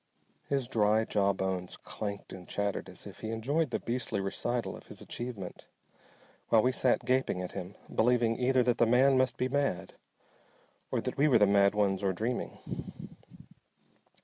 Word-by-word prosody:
His 135 Hz, -3 st, 0 dB
dry 110 Hz, -1 st, +3 dB
jaw 100 Hz, -2 st, +2 dB
bones 95 Hz, -2 st, -3 dB
clanked 100 Hz, -2 st, -6 dB
and 90 Hz, -2 st, -10 dB
chattered 100 Hz, -1 st, -2 dB
as -, -, -12 dB
if -, -, -10 dB
he 110 Hz, -, -5 dB
enjoyed 135 Hz, +8 st, 0 dB
the 120 Hz, -, -1 dB
beastly 115 Hz, -3 st, -2 dB
recital 120 Hz, +5 st, -2 dB
of -, -, -13 dB
his -, -, -10 dB
achievement, 115 Hz, -7 st, -6 dB, 0.8 s
while 110 Hz, -2 st, +5 dB
we 130 Hz, -, +3 dB
sat 130 Hz, 0 st, +1 dB
gaping 130 Hz, -7 st, +1 dB
at 90 Hz, -1 st, -4 dB
him, 90 Hz, +3 st, -7 dB, 0.2 s
believing 120 Hz, 0 st, +3 dB
either 130 Hz, 0 st, +3 dB
that 120 Hz, -1 st, +1 dB
the 120 Hz, -, +5 dB
man 130 Hz, +3 st, +5 dB
must 130 Hz, -2 st, +2 dB
be 125 Hz, -, +1 dB
mad, 130 Hz, -9 st, -1 dB, 1.0 s
or -, -, 0 dB
that -, -, -4 dB
we 145 Hz, +2 st, +4 dB
were 135 Hz, -, +6 dB
the 105 Hz, -, +6 dB
mad 100 Hz, 0 st, +4 dB
ones, 100 Hz, -2 st, +1 dB
or 95 Hz, -2 st, +1 dB
dreaming. 115 Hz, +7 st, -5 dB
115 Hz, 170 wpm, -31 LUFS, 100-125 Hz, 1.0 s, were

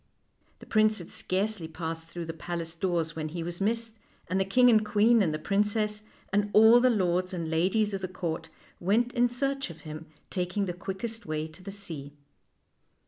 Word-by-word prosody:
The -, -, -13 dB
prince 215 Hz, 0 st, +3 dB
had 175 Hz, -, -9 dB
scarcely 190 Hz, -2 st, -2 dB
passed 165 Hz, 0 st, -5 dB
through 170 Hz, 0 st, -6 dB
the 165 Hz, -, -5 dB
palace 165 Hz, 0 st, -5 dB
doors 165 Hz, -2 st, -1 dB
when 155 Hz, -1 st, -3 dB
he 170 Hz, +1 st, -4 dB
was 175 Hz, +2 st, -5 dB
missed, 225 Hz, +1 st, -1 dB, 0.3 s
and 185 Hz, +2 st, 0 dB
the 190 Hz, -, +2 dB
king 250 Hz, +6 st, +5 dB
and 220 Hz, -3 st, +6 dB
queen 220 Hz, +2 st, +4 dB
and 175 Hz, -5 st, +2 dB
the 155 Hz, -, -1 dB
princess, 210 Hz, +4 st, 0 dB, 0.3 s
and 205 Hz, 0 st, +2 dB
all 220 Hz, +3 st, +8 dB
the 255 Hz, +1 st, +4 dB
lords 185 Hz, -4 st, +1 dB
and 165 Hz, -2 st, -3 dB
ladies 195 Hz, +6 st, +2 dB
of 195 Hz, -, -2 dB
the 185 Hz, -, -2 dB
court, 165 Hz, -3 st, -4 dB, 0.3 s
went 230 Hz, +7 st, +2 dB
in 245 Hz, -1 st, +3 dB
search 275 Hz, +3 st, -1 dB
of -, -, -11 dB
him, 155 Hz, 0 st, -8 dB, 0.2 s
taking 185 Hz, +2 st, -1 dB
the 180 Hz, -, -3 dB
quickest 195 Hz, +5 st, -5 dB
way 155 Hz, 0 st, -2 dB
to 155 Hz, +4 st, -14 dB
the 195 Hz, +2 st, -7 dB
sea. 160 Hz, -8 st, -6 dB
190 Hz, 195 wpm, -28 LUFS, 165-215 Hz, 0.3 s, all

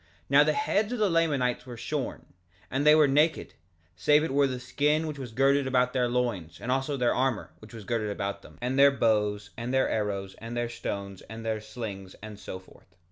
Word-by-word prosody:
3:5 -, -, -32 dB, 0.2 s
Now -, -, +7 dB
the -, -, +2 dB
heads 220 Hz, -, 0 dB
of -, -, -2 dB
the 210 Hz, -4 st, +2 dB
Lamanites 140 Hz, -7 st, +1 dB
were 120 Hz, -2 st, -8 dB
shorn; -, -, -4 dB, 0.4 s
and 140 Hz, +3 st, +1 dB
they 150 Hz, -, +9 dB
were 155 Hz, -2 st, +6 dB
naked, 150 Hz, +4 st, +2 dB, 0.4 s
save 150 Hz, +9 st, +4 dB
it 160 Hz, -, -2 dB
were 135 Hz, -2 st, +2 dB
skin 145 Hz, +5 st, 0 dB
which 150 Hz, -2 st, -5 dB
was 125 Hz, -4 st, -6 dB
girded 135 Hz, +3 st, +3 dB
about 125 Hz, -1 st, +2 dB
their 125 Hz, -2 st, +1 dB
loins, 110 Hz, -10 st, -2 dB
and 125 Hz, -, -3 dB
also 135 Hz, +2 st, 0 dB
their 125 Hz, -2 st, +2 dB
armor, 130 Hz, -3 st, -1 dB
which 110 Hz, -, -14 dB
was 110 Hz, -, -8 dB
girded 110 Hz, 0 st, -1 dB
about 100 Hz, -1 st, -3 dB
them, -, -, -16 dB
and 130 Hz, +2 st, 0 dB
their 140 Hz, 0 st, +8 dB
bows, 105 Hz, -5 st, 0 dB
and 120 Hz, +1 st, -4 dB
their 130 Hz, 0 st, +3 dB
arrows, 100 Hz, -3 st, -2 dB
and 115 Hz, +1 st, -6 dB
their 120 Hz, -1 st, -1 dB
stones, 100 Hz, -4 st, -5 dB
and 115 Hz, 0 st, -8 dB
their 110 Hz, -1 st, -1 dB
slings, 105 Hz, -4 st, -7 dB
and 105 Hz, -2 st, -9 dB
so -, -, -6 dB
forth. 95 Hz, -1 st, -20 dB
125 Hz, 215 wpm, -28 LUFS, 105-140 Hz, 0.4 s, they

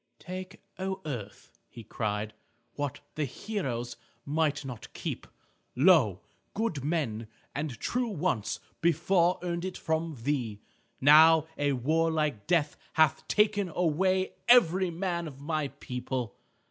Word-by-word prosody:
"Take, 185 Hz, +2 st, -8 dB, 0.2 s
O 190 Hz, 0 st, -2 dB
earth," 115 Hz, -9 st, -6 dB, 0.2 s
he 115 Hz, -, -11 dB
cried, 105 Hz, 0 st, -3 dB, 0.4 s
"what 145 Hz, -2 st, -4 dB
the 155 Hz, -, -1 dB
heroes 125 Hz, -, -4 dB, 0.3 s
might 150 Hz, -1 st, 0 dB
not 125 Hz, -4 st, -8 dB
keep. -, -, -5 dB, 0.5 s
Lo! 130 Hz, -, +5 dB, 0.3 s
good 200 Hz, -, -1 dB
men 135 Hz, -8 st, -1 dB, 0.3 s
and 140 Hz, -5 st, -4 dB
true 245 Hz, 0 st, -1 dB
once 175 Hz, -, -1 dB, 0.2 s
before 170 Hz, +2 st, +3 dB
earned 170 Hz, -1 st, -2 dB
it 185 Hz, 0 st, -4 dB
from 160 Hz, -3 st, -2 dB
thee. 120 Hz, -7 st, -1 dB, 0.4 s
Now 155 Hz, +3 st, +7 dB
a 145 Hz, -1 st, +1 dB
warlike 155 Hz, -2 st, 0 dB
death 160 Hz, -4 st, +2 dB, 0.2 s
hath 160 Hz, 0 st, +3 dB
taken 205 Hz, -2 st, +2 dB
away 185 Hz, +3 st, +1 dB, 0.2 s
every 190 Hz, -6 st, +6 dB
man 170 Hz, -1 st, -2 dB
of 135 Hz, -3 st, -10 dB
my 155 Hz, 0 st, -1 dB
people. 125 Hz, -3 st, -5 dB
155 Hz, 120 wpm, -29 LUFS, 130-180 Hz, 0.5 s, Now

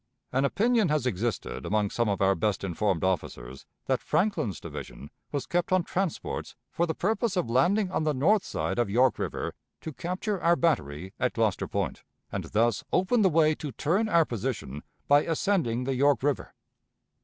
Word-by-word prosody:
An 130 Hz, +2 st, +2 dB
opinion 220 Hz, -, +2 dB
has 150 Hz, -4 st, +1 dB
existed 105 Hz, -, -2 dB
among 105 Hz, -1 st, 0 dB
some 120 Hz, -2 st, 0 dB
of 100 Hz, -1 st, 0 dB
our 95 Hz, 0 st, +4 dB
best 105 Hz, -1 st, -1 dB
informed 95 Hz, -1 st, 0 dB
officers 65 Hz, -9 st, -3 dB, 0.2 s
that -, -, 0 dB
Franklin's 180 Hz, -, 0 dB
division 70 Hz, -, -8 dB, 0.2 s
was 140 Hz, -3 st, -2 dB
kept 175 Hz, +7 st, -1 dB
on 185 Hz, -1 st, +3 dB
transports 185 Hz, -1 st, -3 dB, 0.2 s
for 170 Hz, -, 0 dB
the 160 Hz, -, -2 dB
purpose 215 Hz, +1 st, 0 dB
of 120 Hz, -10 st, 0 dB
landing 185 Hz, -, +2 dB
on 160 Hz, -, 0 dB
the 155 Hz, -2 st, +1 dB
north 190 Hz, +10 st, +3 dB
side -, -, -2 dB
of 120 Hz, -4 st, +1 dB
York 125 Hz, +5 st, +3 dB
River -, -, -3 dB, 0.3 s
to 160 Hz, -, -6 dB
capture 185 Hz, -, -3 dB
our 170 Hz, +1 st, +4 dB
battery 90 Hz, -, -1 dB
at 125 Hz, 0 st, +1 dB
Gloucester 110 Hz, -4 st, 0 dB
Point, -, -, -2 dB, 0.3 s
and -, -, -3 dB
thus 115 Hz, 0 st, +1 dB
open 190 Hz, +6 st, +2 dB
the 190 Hz, -, +5 dB
way 155 Hz, -1 st, +4 dB
to 150 Hz, -2 st, -6 dB
turn 190 Hz, -, +1 dB
our 170 Hz, -5 st, +4 dB
position 110 Hz, -, -4 dB, 0.3 s
by 145 Hz, +1 st, +6 dB
ascending 160 Hz, -, 0 dB
the 135 Hz, +1 st, -1 dB
York 140 Hz, +1 st, +3 dB
River. 145 Hz, -1 st, -1 dB
140 Hz, 180 wpm, -28 LUFS, 110-175 Hz, 0.3 s, by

